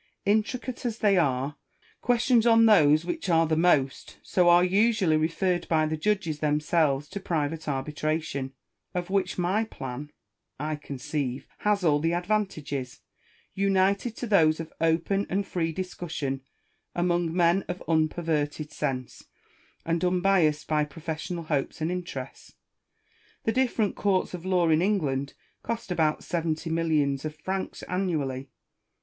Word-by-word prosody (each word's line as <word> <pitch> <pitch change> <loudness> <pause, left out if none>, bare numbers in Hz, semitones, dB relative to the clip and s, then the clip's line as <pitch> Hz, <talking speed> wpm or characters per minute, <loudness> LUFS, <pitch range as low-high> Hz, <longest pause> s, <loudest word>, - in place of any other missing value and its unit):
Intricate 220 +5 0
as 235 -3 -2
they 205 -3 +3
are, 140 -4 +1 0.4
ques 245 -1 +2
tions 240 -3 +4
on 225 -1 +6
those 155 -7 +5
which 325 - -3
are 165 -1 +4
the 160 0 +1
most 155 -5 +1
so 180 -2 +3
are 175 +1 +6
usually 195 -2 +3
referred 170 +3 0
by 155 -1 +2
the 155 0 -1
judges 170 -3 -1
themselves 150 -1 +1
to 200 - -5
private 160 -3 -2
arbitration; 150 0 -2 0.4
of 180 +1 -3
which 195 -1 0
my 185 +5 +1
plan, 140 - -7 0.5
I 155 +1 -2
conceive, 140 -2 -4
has 210 -2 +1
all 150 -3 +4
the 165 +3 0
advantages, 175 -9 -2 0.5
united 195 +3 +1
to 245 - -4
those 160 -8 +4
of 165 -1 -7
open 170 +5 +1
and 195 +2 0
free 165 -3 -1
discussion 160 -6 -4 0.5
among 175 -1 +1
men 175 +2 +3
of 180 - -5
unperverted 155 -2 0
sense, 130 -4 -4 0.6
and 165 +1 0
unbiassed 180 -4 +2
by 155 -1 +2
professional 160 +3 -5
hopes 150 -2 -2
and 160 +2 -1
interests. 170 -8 -6 0.9
The 225 - +1
different 240 -4 +1
courts 195 -3 0
of 180 0 -6
law 180 -3 +3
in 160 0 +4
England 145 -9 0 0.3
cost 230 -4 -4
about 160 -3 +1
seventy 165 -1 -2
mil 165 0 0
lions 140 -3 +1
of 155 -1 -4
francs 190 +5 -4
annually. 145 -8 -2
165 Hz, 140 wpm, -27 LUFS, 150-190 Hz, 0.9 s, on